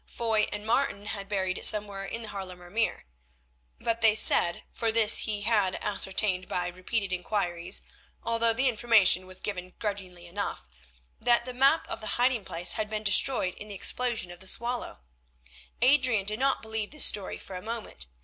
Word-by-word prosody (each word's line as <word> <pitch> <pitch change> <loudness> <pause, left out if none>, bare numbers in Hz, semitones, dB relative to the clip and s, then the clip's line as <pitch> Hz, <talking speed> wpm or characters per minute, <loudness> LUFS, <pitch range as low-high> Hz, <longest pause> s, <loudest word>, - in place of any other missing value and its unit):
Foy 225 -2 0
and 210 0 -6
Martin 225 -3 -1
had 200 -1 -6
buried 190 -2 -2
it - - +3
somewhere 205 -2 +3
in 230 +4 -6
the 215 - -4
Haarlemer 180 -3 -9
Meer. 225 - -2 0.7
But 230 0 -2
they 220 -1 +4
said, 175 -5 +5
for 230 -1 -1
this 220 0 +6
he 205 -1 -3
had 205 -4 +1
ascertained 190 -2 -1
by 180 - -2
repeated 185 +2 -4
inquiries, 175 -2 -2 0.4
although 230 0 +1
the 260 +4 0
information 215 -6 +3
was 185 0 -7
given 185 -3 -6
grudgingly 190 -4 -6
enough, 195 +4 -5 0.5
that 240 0 +2
the 255 - -6
map 270 +6 +2
of 225 - -6
the 215 -1 -3
hiding 245 -3 +1
place 175 +1 0
had 215 -1 -2
been 215 0 -4
destroyed 205 -2 +3
in 210 - -10
the 205 - -8
explosion 230 -2 -1
on 175 - -12
the 190 - -4
Swallow. 235 - -1 0.8
Adrian 255 -6 +3
did 215 +2 -1
not 270 -2 0
believe 220 -1 -4
this 300 -1 +3
story 200 -3 0
for 190 - -10
a 180 - -6
moment. 225 - -6
210 Hz, 180 wpm, -27 LUFS, 185-230 Hz, 0.8 s, this